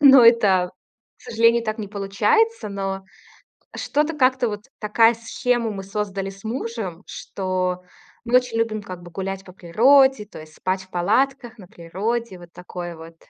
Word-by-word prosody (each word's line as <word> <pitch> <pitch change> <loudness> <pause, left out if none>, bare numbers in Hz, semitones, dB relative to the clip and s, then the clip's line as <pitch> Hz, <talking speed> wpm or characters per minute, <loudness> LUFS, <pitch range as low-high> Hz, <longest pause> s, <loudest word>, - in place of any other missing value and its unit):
Но 270 -4 +8
это, 200 -6 +5 0.5
к - - -24
сожалению, 230 +1 +3
так 215 0 -3
не 210 -2 -5
получается. 215 - +1
Но 195 -1 -4 0.7
что-то 300 +2 0
как-то 255 -3 +2
вот 210 0 -6
такую 225 +2 +4
схему 235 0 -1
мы 195 -2 -6
создали 195 -1 -3
с 195 0 -13
мужем, 220 -6 -5
что 185 -1 -3 0.4
мы 240 +1 +1
очень 245 -2 -1
любим, 225 -2 -1
как 185 -3 -9
бы, 175 - -12
гулять 195 +2 -4
по 185 - -13
природе, 245 +7 +4
то 205 - -12
есть 155 0 -13
спать 185 +1 -2
в 190 - -21
палатках 240 +7 0
на 190 -4 -13
природе, 195 +5 -4
вот 175 -1 -14
такое 175 -1 -7
вот. 165 +1 -12
210 Hz, 165 wpm, -22 LUFS, 185-235 Hz, 0.7 s, Но